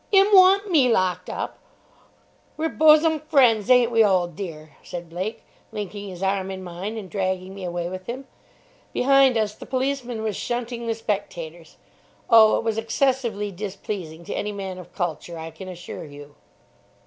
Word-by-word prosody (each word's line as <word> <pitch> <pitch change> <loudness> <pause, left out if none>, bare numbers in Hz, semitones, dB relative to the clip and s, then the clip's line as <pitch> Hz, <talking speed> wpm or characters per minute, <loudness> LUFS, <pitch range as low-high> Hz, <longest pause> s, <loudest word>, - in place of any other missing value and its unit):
"'Im 395 +1 +5
want 390 +1 +6
me 280 -7 +5
locked 185 -5 +1
up? - - -5 1.0
We're 320 +1 0
bosum 315 0 +5
fren's, 255 -8 +3
ain't 250 -2 +5
we, 225 -1 +5
old 180 -5 +2
dear?" 155 -5 -8
said 175 -1 -8
Blake, 190 +6 -4 0.3
linking 205 -1 -6
his 185 0 -7
arm 190 0 0
in 190 -1 -6
mine 185 +5 -5
and 205 -3 -6
dragging 185 -1 -2
me 195 -1 -8
away 175 -1 -3
with 185 +1 -7
him. 260 +3 -5 0.7
Behind 270 -1 +4
us, 215 -1 0
the - - -12
policeman 255 -3 -2
was 215 -2 -2
shunting 240 0 -4
the 225 - 0
spectators. 175 -7 -5 0.5
Oh, 220 -1 +7
it - - -3
was 225 -1 0
excessively 230 -3 0
displeasing 185 -4 -6
to - - -5
any 210 - -2
man 190 -2 -6
of 180 - -12
culture, 175 -1 -4
I 160 0 -7
can 175 +4 -10
assure 180 -2 -8
you. 145 0 -12
205 Hz, 165 wpm, -24 LUFS, 180-245 Hz, 1.0 s, Oh